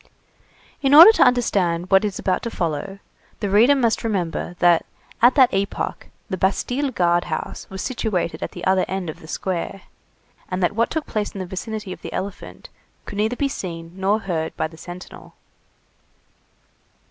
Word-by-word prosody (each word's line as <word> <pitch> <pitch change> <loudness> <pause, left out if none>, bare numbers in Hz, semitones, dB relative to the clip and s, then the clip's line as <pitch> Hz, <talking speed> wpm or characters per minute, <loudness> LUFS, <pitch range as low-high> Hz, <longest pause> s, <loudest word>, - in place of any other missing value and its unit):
In 275 +1 +4
order 335 +8 +12
to - - -1
understand 185 -8 +1
what 195 +1 +6
is 205 -3 -2
about 185 - 0
to 235 - -4
follow, 170 0 -3 0.4
the 205 - -2
reader 235 +8 +6
must 235 -5 +1
remember, 180 -5 -2
that, 175 -1 +4 0.4
at 245 +3 +6
that 260 -4 +5
epoch, 195 +1 -2 0.2
the 190 - -3
Bastille 245 +9 0
guard 175 -6 +1
house 160 - -5
was 190 -1 -6
situated 220 -9 -2
at - - -5
the - - -7
other 190 0 +3
end 190 -3 -3
of - - -15
the 160 - -13
square, 185 +2 -4 0.7
and 185 0 -2
that 175 - +2
what 230 +2 +1
took 315 -2 -3
place 210 -1 -2
in - - -5
the 185 - -3
vicinity 205 +1 -5
of - - -13
the - - -7
elephant 195 0 -6 0.4
could 205 - -6
neither 220 +3 +1
be 280 - 0
seen 170 -10 -6
nor 195 +3 0
heard 165 -5 -3
by - - 0
the 160 - -15
sentinel. 175 +2 -11
195 Hz, 175 wpm, -22 LUFS, 175-225 Hz, 0.7 s, order